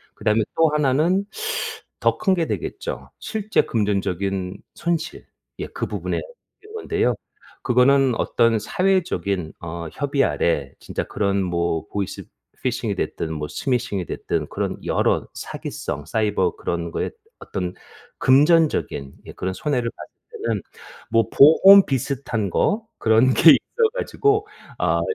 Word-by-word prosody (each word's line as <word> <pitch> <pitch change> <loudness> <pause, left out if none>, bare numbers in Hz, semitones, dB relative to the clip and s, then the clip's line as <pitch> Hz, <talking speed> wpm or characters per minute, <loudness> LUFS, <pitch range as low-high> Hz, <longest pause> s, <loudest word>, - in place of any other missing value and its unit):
그다음에 110 +1 +1 0.2
또 165 -1 +5
하나는 150 +6 +2 0.7
더 - - +2
큰 190 - +2
게 170 -3 0
되겠죠. - - -5
실제 215 -1 0
금전적인 100 -3 -1 0.2
손실 170 -2 -3 0.3
예 - - -3
그 - - -4
부분에 - - -3 0.5
있는 425 +1 -14
건데요. 420 0 0 0.5
그거는 130 +1 +4
어떤 115 0 +2
사회적인 100 - 0
어 85 0 -6
협의 140 -1 0
아래 70 - 0
진짜 - - -4
그런 100 -1 -1
뭐 85 -2 -1
보이스 100 -2 -4 0.4
피싱이 115 -4 -1
됐든 80 -3 -3
뭐 75 -1 -4
스미싱이 120 -8 -1
됐든 - - -3
그런 - - -3
여러 - - +1
사기성 70 0 -6
사이버 105 -4 0
그런 85 -1 -3
거에 - - -2 0.3
어떤 90 -2 -4 0.5
금전적인 145 - +3
예 - - -9
그런 95 0 -3
손해를 125 +1 -1
봤을 - - -11 0.3
때는 110 -4 -1 0.5
뭐 115 -1 +3
보험 190 +7 +8
비슷한 130 -5 -2
거 220 - +1
그런 115 +4 +4
게 160 - +8
있어 460 -2 +2
가지고 420 -3 +1 0.3
아 - - +2
115 Hz, 265 characters per minute, -22 LUFS, -, 0.7 s, 보험